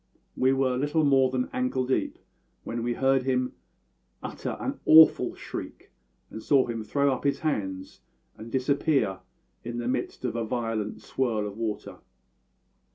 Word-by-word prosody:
We 130 Hz, +1 st, +3 dB
were 135 Hz, -2 st, +1 dB
little 150 Hz, +3 st, +1 dB
more 135 Hz, -2 st, +4 dB
than 130 Hz, -1 st, -1 dB
ankle 255 Hz, -, 0 dB
deep 130 Hz, -, -1 dB, 0.5 s
when 115 Hz, 0 st, -4 dB
we 120 Hz, +1 st, -1 dB
heard 135 Hz, 0 st, +3 dB
him 125 Hz, -1 st, 0 dB, 0.7 s
utter -, -, -5 dB
an -, -, -4 dB
awful 160 Hz, 0 st, +7 dB
shriek, -, -, -8 dB, 0.4 s
and 110 Hz, -, -7 dB
saw 135 Hz, +1 st, +3 dB
him 115 Hz, -2 st, -4 dB
throw 140 Hz, +5 st, +1 dB
up 130 Hz, -, -5 dB
his 140 Hz, -1 st, 0 dB
hands 95 Hz, -11 st, -3 dB, 0.3 s
and 115 Hz, +2 st, -10 dB
disappear 135 Hz, -5 st, +1 dB, 0.4 s
in 120 Hz, 0 st, -5 dB
the 120 Hz, 0 st, -3 dB
midst 125 Hz, -, -3 dB
of 120 Hz, -, -2 dB
a 115 Hz, -, -1 dB
violent 115 Hz, -2 st, -3 dB
swirl 115 Hz, -5 st, -1 dB
of 100 Hz, -1 st, -6 dB
water. 110 Hz, -1 st, -4 dB
125 Hz, 155 wpm, -27 LUFS, 115-135 Hz, 0.7 s, awful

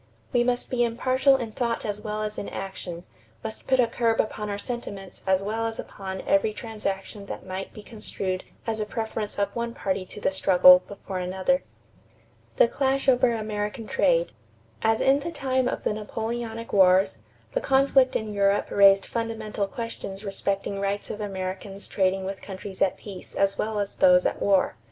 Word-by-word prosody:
We 240 Hz, -1 st, +4 dB
must 245 Hz, 0 st, -1 dB
be 245 Hz, -1 st, +2 dB
impartial 255 Hz, +3 st, +3 dB
in 240 Hz, -4 st, -3 dB
thought 235 Hz, +1 st, -2 dB
as 210 Hz, -1 st, -3 dB
well 215 Hz, 0 st, -3 dB
as 210 Hz, 0 st, -4 dB
in -, -, -5 dB
action, 180 Hz, -3 st, -6 dB, 0.4 s
must 220 Hz, -, -7 dB
put 260 Hz, -1 st, +3 dB
a 245 Hz, -, +6 dB
curb 230 Hz, -1 st, 0 dB
upon 210 Hz, -1 st, -1 dB
our 200 Hz, -, -2 dB
sentiments 205 Hz, -4 st, -6 dB
as 190 Hz, 0 st, +3 dB
well 225 Hz, +3 st, -1 dB
as 225 Hz, -, -4 dB
upon 190 Hz, -1 st, -6 dB
every 210 Hz, +2 st, +2 dB
transaction 205 Hz, -2 st, -5 dB
that -, -, -7 dB
might 190 Hz, +1 st, -5 dB
be 215 Hz, -, -11 dB
construed 195 Hz, -4 st, -4 dB, 0.2 s
as 225 Hz, -1 st, -2 dB
a 215 Hz, -, -1 dB
preference 220 Hz, -1 st, -3 dB
of 200 Hz, 0 st, -1 dB
one 235 Hz, 0 st, -3 dB
party 190 Hz, -1 st, -1 dB
to -, -, -9 dB
the 195 Hz, -, +1 dB
struggle 180 Hz, -1 st, +7 dB
before 195 Hz, -1 st, -6 dB
another." 190 Hz, +9 st, +1 dB, 0.9 s
=The -, -, +6 dB
Clash 270 Hz, 0 st, 0 dB
over 255 Hz, -1 st, +5 dB
American 215 Hz, +1 st, -3 dB
Trade.= -, -, +2 dB, 0.5 s
As 225 Hz, 0 st, +2 dB
in 275 Hz, +1 st, +4 dB
the 335 Hz, +4 st, -4 dB
time 260 Hz, -4 st, 0 dB
of -, -, -3 dB
the -, -, +1 dB
Napoleonic 225 Hz, +2 st, -4 dB
wars, 190 Hz, 0 st, +5 dB, 0.3 s
the -, -, 0 dB
conflict 270 Hz, -1 st, +4 dB
in 215 Hz, -1 st, -2 dB
Europe 200 Hz, 0 st, +2 dB
raised 195 Hz, -1 st, +6 dB
fundamental 225 Hz, -3 st, -3 dB
questions 220 Hz, -4 st, -6 dB
respecting 195 Hz, 0 st, -2 dB
rights 200 Hz, +1 st, -2 dB
of 210 Hz, -, -6 dB
Americans 195 Hz, 0 st, -5 dB
trading 190 Hz, 0 st, +1 dB
with 195 Hz, 0 st, -5 dB
countries 190 Hz, 0 st, -8 dB
at 190 Hz, -, +2 dB
peace 195 Hz, -3 st, -9 dB
as 195 Hz, 0 st, +1 dB
well 215 Hz, 0 st, -1 dB
as 200 Hz, -1 st, -2 dB
those 180 Hz, -1 st, +6 dB
at -, -, -1 dB
war. 195 Hz, -2 st, +3 dB
210 Hz, 180 wpm, -26 LUFS, 195-235 Hz, 0.9 s, struggle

